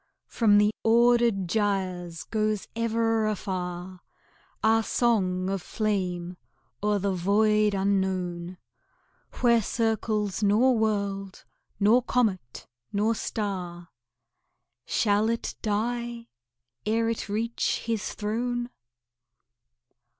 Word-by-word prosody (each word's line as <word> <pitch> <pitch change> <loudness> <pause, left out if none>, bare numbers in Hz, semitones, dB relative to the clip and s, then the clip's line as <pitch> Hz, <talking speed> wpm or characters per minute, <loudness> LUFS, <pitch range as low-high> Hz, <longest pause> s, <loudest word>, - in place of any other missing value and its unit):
From 210 -3 +3
the 210 +1 +4
ordered 235 -4 +4
gyres 185 -4 -1
goes 215 -2 -1
ever 225 -1 +1
afar 180 -3 -4 0.6
Our 225 +1 +4
song 190 -6 +1
of 195 -1 -2
flame 180 -5 -2 0.4
o'er 210 0 +2
the 200 0 -1
void 210 +3 +2
unknown, 185 -2 -1 0.8
Where 235 -2 +5
circles 215 -2 -1
nor 220 +5 +4
world, 200 -3 -2 0.3
nor 220 +5 +5
comet, 200 - -1 0.3
nor 210 +3 +1
star. 180 -6 -4 1.0
Shall 210 0 +2
it 230 0 -2
die 235 +2 -2 0.5
ere 225 +2 +1
it 230 -2 -3
reach 230 +3 -1
His 225 -2 -2
throne? 240 +3 -2
210 Hz, 90 wpm, -27 LUFS, 190-225 Hz, 1.0 s, Where